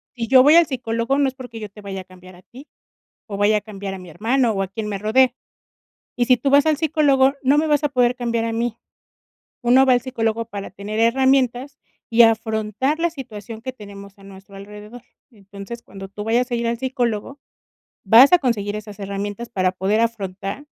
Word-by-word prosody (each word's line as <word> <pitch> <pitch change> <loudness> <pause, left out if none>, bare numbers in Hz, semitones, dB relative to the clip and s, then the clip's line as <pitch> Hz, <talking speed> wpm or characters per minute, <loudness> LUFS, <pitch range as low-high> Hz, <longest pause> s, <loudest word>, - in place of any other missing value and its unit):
si 230 -2 -4
yo 255 0 +6
voy 295 +3 +6
al 340 -1 +6
psicólogo 235 0 -2
no 285 -1 +2
es 260 - -3
porque 245 -4 -10
yo 210 -1 -7
te 210 +1 -14
vaya 195 -1 -6
a - - -12
cambiar 185 0 -16
a 180 - -19
ti, 265 +9 -15 0.6
o 205 - -6
vaya 205 +1 +3
a - - -7
cambiar 200 -2 -7
a - - -8
mi 180 -1 -12
hermano, 230 - 0
o 195 -2 -2
a 190 - -4
quien 210 +3 -6
me 205 - -3
rodea. 245 +5 +2 0.8
Y 245 - +1
si 255 0 +4
tú 275 - -1
vas 285 +2 +5
al 310 -2 +2
psicólogo, 285 -4 +2
no 275 +3 +3
me 315 - 0
vas 295 -1 +1
a 295 - +1
poder 250 -2 +2
cambiar 235 -2 -2
a 230 - -2
mí, 230 0 -2 0.9
uno 255 +3 +4
va 255 - +5
al 245 - +2
psicólogo 230 -3 -2
para 205 -3 -8
tener 210 +2 -5
herramientas 260 +2 +1 0.3
y 235 +1 +6
afrontar 225 +4 +1
la 340 +1 +1
situación 225 - -9
que 260 - -5
tenemos 200 -4 -13
a - - -18
nuestro 195 0 -14
alrededor, 210 +4 -11 0.3
entonces, 200 +1 -11
cuando 195 -2 -11
tú 205 +2 -8
vayas 240 +3 0
a - - -1
ir 235 0 -2
al 235 0 -2
psicólogo, 255 0 -3 0.7
vas 230 +7 +7
a 355 - +7
conseguir 210 -7 -1
esas 210 -1 -10
herramientas 200 +3 -5
para 185 -4 0
poder 195 +4 0
afrontar 205 +2 -3
230 Hz, 210 wpm, -21 LUFS, 205-260 Hz, 0.9 s, vas